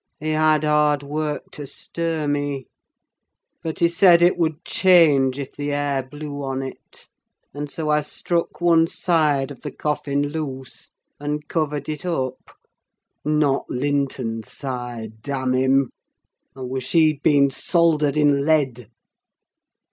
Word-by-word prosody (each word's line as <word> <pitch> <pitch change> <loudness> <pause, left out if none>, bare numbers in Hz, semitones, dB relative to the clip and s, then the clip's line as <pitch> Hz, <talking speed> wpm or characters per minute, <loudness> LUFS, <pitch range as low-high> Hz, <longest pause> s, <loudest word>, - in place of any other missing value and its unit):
—he 155 +1 -2
had 155 0 +3
hard 150 -1 +2
work 150 +1 -3
to 145 -2 -7
stir 165 +1 -3
me; 145 -2 -2 1.0
but 160 -1 -4
he 170 - +4
said 170 0 +6
it 175 +1 +4
would 160 -1 -1
change 150 -8 +4
if 140 -2 -5
the 145 0 -3
air 145 -1 0
blew 145 +2 -7
on 135 0 -3
it, 130 - -11 0.5
and 145 +1 -5
so 155 +2 -4
I 150 0 +3
struck 170 +3 -2
one 165 -2 +4
side 150 -6 +1
of 135 - -11
the 150 - -5
coffin 145 0 -2
loose, 135 -4 -6 0.3
and 150 +1 -4
covered 150 -3 -2
it 155 -1 -4
up: 130 -8 -3 0.7
not 150 -2 +1
Linton's 130 -5 -2
side, 120 -5 -5
damn 130 0 -2
him! 130 +1 +2 0.6
I 135 - -10
wish 130 0 -4
he'd 155 -3 +4
been 140 -2 +4
soldered 155 -1 +2
in 145 -2 +3
lead. 135 -7 +1
145 Hz, 135 wpm, -22 LUFS, 135-155 Hz, 1.0 s, said